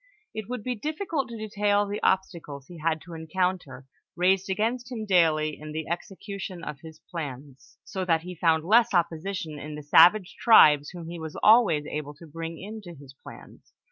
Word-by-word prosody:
It 220 0 -6
would 250 -3 -4
be 250 - -2
difficult 305 - -3
to 230 - -7
detail 205 -1 +1
the 205 +1 -5
obstacles 170 -7 -1
he 175 +1 -12
had 160 0 -1
to 175 - -11
en 160 0 -8
counter, 180 -7 -2 0.3
raised 185 +2 +2
against 235 +6 -1
him 225 -3 -4
daily 160 -5 +2
in 155 0 -8
the 160 0 -4
execution 190 0 -6
of 145 - -6
his 160 +1 -12
plans, 140 -5 -8
so 190 - -4
that 165 -2 +2
he 180 +2 -8
found 165 -2 +2
less 225 +2 +4
opposition 170 -2 -2
in 150 +1 -7
the 150 - -8
savage 180 +6 +5
tribes 150 -10 +6
whom 175 -2 -9
he 170 0 -7
was 160 -1 -7
always 210 -10 +5
able 150 -1 -5
to 165 - -14
bring 165 +1 -7
into 205 -3 -9
his 135 -2 -14
plans. - - -15
175 Hz, 185 wpm, -26 LUFS, 155-205 Hz, 0.3 s, tribes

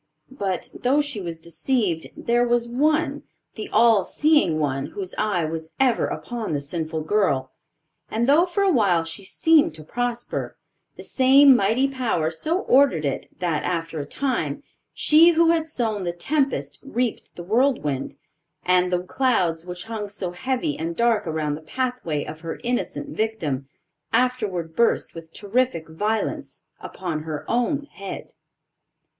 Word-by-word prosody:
But, 190 -2 -2
though 265 +4 +1
she 290 -8 -2
was 170 -2 -5
deceived, 170 - -1
there 240 +1 +2
was 240 0 +2
one, 305 +7 +1 0.3
the 215 - -7
All 225 -4 +5
seeing 295 - +2
One, 135 -2 -1
whose 195 -2 -6
eye 205 -6 0
was 160 0 -5
ever 255 -3 +3
upon 235 -8 -4
the 145 - 0
sinful 160 +2 -4
girl; 150 -9 +1 0.6
and 230 +2 0
though 315 +6 +5
for 400 +3 0
a 390 - +4
while 195 - +3
she 165 +5 -6
seemed 320 - +3
to 155 - -10
prosper, 240 +7 -3 0.4
the - - -10
same 270 +1 +6
mighty 225 +5 +2
Power 235 -12 -1
so 320 - -1
ordered 255 - +3
it, 140 - -3
that 170 -4 -1
after 165 -2 -2
a 145 - -4
time, 225 - -2 0.3
she 330 +3 +5
who 330 0 +4
had 325 -1 0
sown 225 -9 -1
the 175 - -1
tempest 275 - -1
reaped 250 -3 -3
the 175 - -7
whirlwind; 195 - 0 0.5
and 180 0 +3
the 180 0 0
clouds 180 -7 0
which 180 0 -6
hung 220 -2 -5
so 195 -3 -4
heavy 250 - -2
and 165 +1 -3
dark 235 -3 +2
around 155 -2 -1
the 150 - -6
pathway 245 - -2
of 155 +1 -8
her 165 -1 -5
innocent 245 +4 -2
victim, 165 - -2 0.4
afterward 205 -10 0
burst 235 - +2
with 165 -1 -10
terrific 205 -5 -1
violence 210 +7 -3 0.2
upon 170 -5 -5
her 155 -2 -5
own 245 +5 0
head. 195 -8 -8
210 Hz, 150 wpm, -23 LUFS, 165-255 Hz, 0.6 s, same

